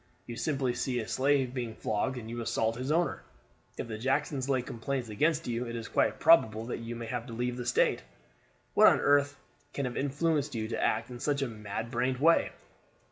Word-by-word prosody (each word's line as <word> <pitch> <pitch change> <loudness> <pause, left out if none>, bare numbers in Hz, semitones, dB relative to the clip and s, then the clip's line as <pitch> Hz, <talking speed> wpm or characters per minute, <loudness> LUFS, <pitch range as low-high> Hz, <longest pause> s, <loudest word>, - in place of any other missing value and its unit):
You 120 - -7
simply 135 0 -1
see 125 +1 -1
a 110 - -4
slave 135 -2 +1
being 120 -4 -4
flogged 110 +5 -1
and 115 -2 -7
you 120 +1 -5
assault 115 0 0
his 130 +4 -3
owner. 165 -2 +1 0.6
If - - -4
the 110 -1 -6
Jacksons 135 +1 -1
lay 130 -2 +1
complaints 120 +1 -4
against 155 +9 +1
you 120 0 -2
it 115 - -5
is 115 -1 -5
quite - - +1
probable 115 -9 +5
that 120 - -4
you 115 +1 -6
may 115 0 -6
have 120 0 -4
to 115 - -8
leave 120 +1 -2
the 125 -1 -5
state. 120 - +2 0.7
What - - +7
on - - +5
earth 145 0 +3 0.4
can 140 - -2
have 125 - -4
influenced 145 0 0
you 110 -1 -2
to - - -2
act 115 +3 0
in 120 - -7
such 140 +1 0
a - - -1
mad 110 0 -5
brained 125 +1 0
way?" 165 +5 +4
125 Hz, 210 wpm, -30 LUFS, 115-140 Hz, 0.7 s, What